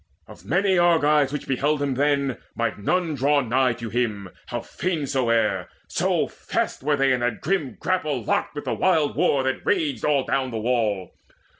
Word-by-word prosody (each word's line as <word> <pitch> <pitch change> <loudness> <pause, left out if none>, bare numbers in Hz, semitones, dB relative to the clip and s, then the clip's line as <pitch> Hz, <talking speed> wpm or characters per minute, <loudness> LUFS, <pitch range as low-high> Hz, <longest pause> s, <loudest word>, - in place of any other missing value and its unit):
Of 85 - -14
many 185 - +2
Argives 150 -5 +4
which 150 - -4
beheld 145 +3 +1
him 140 -2 0
then 140 -1 +1 0.2
Might 115 -2 -2
none 170 - 0
draw 145 +2 +2
nigh 125 0 +2
to 115 -2 -7
him, 110 -5 -1 0.2
how - - -3
fain 170 -5 -3
soe'er, 115 -8 +1 0.2
So - - +1
fast - - -3
were 145 +2 +1
they 135 -1 +3
in 125 - 0
that 120 -2 -1
grim 155 - -1
grapple 155 -7 -1
locked 145 - -1
Of 145 - -5
the - - -1
wild 160 -6 +2
war 135 -2 +2
that 130 0 -2
raged 150 - 0
all 145 -3 +2
down 135 -1 -1
the 115 - -4
wall. 110 -5 0
135 Hz, 180 wpm, -24 LUFS, 120-150 Hz, 0.2 s, Argives